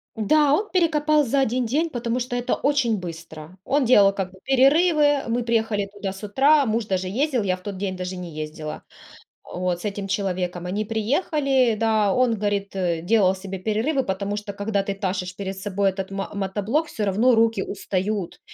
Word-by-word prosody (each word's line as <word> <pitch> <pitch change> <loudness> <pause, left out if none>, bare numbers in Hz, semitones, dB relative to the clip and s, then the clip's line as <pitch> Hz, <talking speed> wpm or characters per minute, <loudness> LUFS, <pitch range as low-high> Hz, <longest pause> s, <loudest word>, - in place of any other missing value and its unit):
Да, 285 +7 +3
он 420 +6 0
перекопал 305 -4 +3
за 275 +3 +1
1 250 0 0
день, 310 +8 0
потому 240 -1 -2
что 245 0 -3
это 245 0 0
очень 275 -6 +1
быстро. 165 -1 -9
Он 280 -1 +1
делал 200 -5 +6
как 190 -2 -3
бы 190 - -17
перерывы. 290 +2 +4
Мы 240 +1 0
приехали 220 -3 0
туда 200 -1 -4
с 195 +2 -11
утра, 275 +8 +4
муж 225 -1 0
даже 185 -2 -1
ездил, 255 +4 0
я 185 -2 +1
в 185 - -16
тот 200 0 -6
день 190 -1 -3
даже 185 0 -5
не 180 -2 -7
ездила. 155 0 -6 0.6
Вот. 180 -1 -3
С - - -8
этим 200 -1 -3
человеком 180 -3 -2
они 205 +3 -2
приехали, 260 - +1
да, 215 -2 +2
он, 250 -3 +2
говорит, 200 -1 -2
э, 175 -3 -1
делал 190 0 +3
себе 190 0 -6
перерывы, 225 - 0
потому 200 +1 -3
что, 210 -1 -6
когда 200 0 -1
ты 200 - -2
тащишь 185 -2 -3
перед 195 -1 -5
собой 200 0 0
этот 190 0 -5
мо 195 0 -4
мотоблок, 205 - -1
всё 220 - -4
равно 215 +6 +3
руки 225 -3 +2
устают, 195 -1 -3
205 Hz, 190 wpm, -23 LUFS, 190-250 Hz, 0.6 s, делал